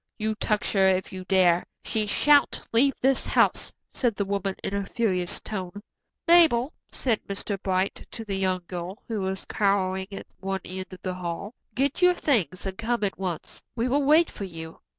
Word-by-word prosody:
"You 220 -1 -1
touch 210 0 0
her 195 -2 +4
if 190 0 +1
you 185 -1 -6
dare. 180 -2 +4 0.2
She 215 -1 -1
shan't 290 +6 +4
leave 270 +4 +4
this 265 +1 +3
house," - - +2 0.2
said 240 -5 +1
the 200 - -1
woman 195 -1 -1
in - - -3
a 200 0 0
furious 190 -5 0
tone. 205 -1 -6 0.4
"Mabel," 320 -6 +5 0.2
said 235 -5 -1
Mr. 200 0 -3
Bright 190 +1 -1
to 225 - -7
the 200 -2 -2
young 185 -1 0
girl, 180 +2 -6
who 220 -3 -2
was 190 0 -3
cowering 190 -2 +1
at 195 - -7
one 195 -1 -3
end 185 +1 -5
of 185 - -11
the 185 - -2
hall, 180 +4 -5 0.2
"get 275 +6 0
your 360 0 +6
things 200 - 0
and 190 +1 -5
come 230 0 0
at 195 -2 -1
once. 180 -4 -5
We 235 +1 0
will 280 +3 +2
wait 310 +4 +5
for 200 - -6
you. 165 -3 -8
200 Hz, 190 wpm, -26 LUFS, 185-235 Hz, 0.4 s, your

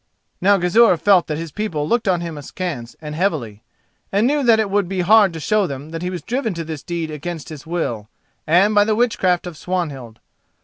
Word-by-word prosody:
Now 200 +2 +5
Gizur 185 +2 +4
felt 185 +1 +4
that 150 - -3
his 165 -1 -6
people 160 -8 -3
looked 235 +1 0
on 180 -3 +2
him 170 -2 -5
askance 145 -4 -6
and 150 -1 -6
heavily, 150 - -2 0.5
and 205 +3 +2
knew 290 +3 +2
that 230 -4 +4
it 210 -3 0
would 200 -3 +1
be 190 -1 -1
hard 205 +1 +5
to 165 - -6
show 210 +4 +1
them 140 +2 -7
that 165 0 -5
he 180 - -2
was 180 -4 -6
driven 235 -3 -2
to 165 - -4
this 155 -3 -6
deed 170 -3 -4
against 155 +1 -6
his 155 0 -10
will, 120 -11 -3 0.4
and 185 +7 +4
by 205 -1 +5
the 215 +1 +1
witchcraft 195 -7 +1
of 175 -2 -7
Swanhild. 145 -11 -4
175 Hz, 215 wpm, -20 LUFS, 155-205 Hz, 0.5 s, Now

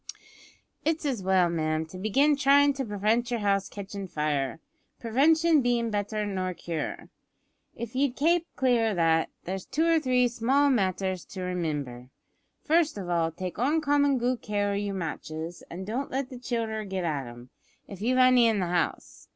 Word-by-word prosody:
"It's 320 0 0
as 260 -8 -1
well, 185 -1 +3
ma'am, 155 -1 -1
to 185 +3 -10
begin 270 +9 +3
by 285 - -2
tryin' 285 +1 +5
to 270 -1 -3
prevent 215 +3 0
yer 240 - 0
house 200 -2 0
ketchin' 200 -1 -7
fire 150 -4 -2 0.4
prevention 310 +7 +3
bein' 240 -2 0
better 210 +1 -2
nor 185 -2 -3
cure. 165 -3 -5 0.7
If 235 -1 -6
ye'd 270 -1 +1
kape 335 +3 +2
clear 245 -4 +2
o' - - -4
that, 165 -1 +2
there's 190 +1 -4
two 310 +5 0
or 330 -1 +4
three 250 -4 +2
small 265 +5 +2
matters 190 -5 0
to 190 - -8
remimber. 150 -9 -3 0.5
First 315 -4 +2
of 185 -3 -5
all, 165 -1 +1
take 180 +3 -6
oncommon 285 0 +2
good 245 0 -1
care 205 -1 -1
o' - - -1
your 200 -1 -2
matches, 165 -1 -5
an' 180 +3 -6
don't 240 +7 -3
let 270 0 -3
the 250 - -8
childer 225 -3 -2
git 190 -2 -4
at 145 -6 -2
'em, 120 +1 -12 0.4
if 195 -1 -10
you've 250 +4 +1
any 255 -2 +6
in 220 -3 +1
the 185 - 0
house. 175 -2 -2
210 Hz, 175 wpm, -27 LUFS, 180-260 Hz, 0.7 s, any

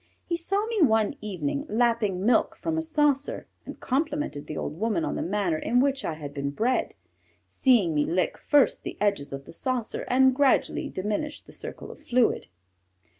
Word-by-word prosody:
He 340 - -1
saw 390 +5 -1
me 450 -3 -1
one 220 -7 +4
evening 195 - -2
lapping 220 -5 +1
milk 235 -1 +3
from 325 - -2
a 320 - 0
saucer 295 -3 0 0.2
and - - -8
complimented 285 - -2
the 155 - -5
old 155 - -4
woman 210 -6 0
on - - -2
the - - -2
manner 180 -4 0
in 245 +8 +1
which 275 +1 +1
I 160 - -2
had 145 -2 -8
been 140 -1 -2
bred, 230 - 0 0.5
seeing 180 - +3
me 150 -1 +2
lick 180 +4 0
first 290 -2 +3
the - - -7
edges 200 -8 0
of 135 0 -6
the - - -12
saucer 250 +3 -3
and 260 +1 +5
gradually 275 0 +2
diminish 215 +10 -3
the - - -15
circle - - -8
of - - -13
fluid. 245 - +2
230 Hz, 180 wpm, -26 LUFS, 175-280 Hz, 0.5 s, and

